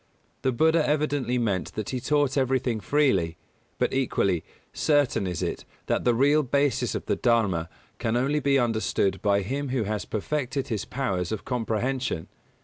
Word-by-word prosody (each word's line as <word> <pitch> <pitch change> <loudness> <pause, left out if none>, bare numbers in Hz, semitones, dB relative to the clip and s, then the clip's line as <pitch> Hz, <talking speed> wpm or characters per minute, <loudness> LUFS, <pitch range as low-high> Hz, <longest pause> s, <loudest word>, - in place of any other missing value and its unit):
The 130 - +1
Buddha 160 +6 +3
evidently 145 -4 0
meant 105 -7 -1
that 110 -2 -4
he 130 - -2
taught 145 +1 +1
everything 130 -4 +1
freely; 95 - +1 0.4
but - - 0
equally 100 -9 +1 0.3
certain 145 -10 +2
is 90 -3 -3
it - - -3 0.2
that - - -1
the 120 -1 +4
real 145 +5 +4
basis 140 0 +1
of - - -4
the - - +1
Dharma 100 -9 +1 0.3
can 115 +1 0
only 140 +4 +1
be 140 -1 +3
understood 110 -5 0
by 100 -1 +2
him 140 +7 -3
who 125 -3 0
has 105 -1 -3
perfected 135 +4 -2
his 110 -4 -2
powers 95 -10 -2
of 110 - -4
comprehension. 125 -5 -2
125 Hz, 160 wpm, -26 LUFS, 105-140 Hz, 0.4 s, the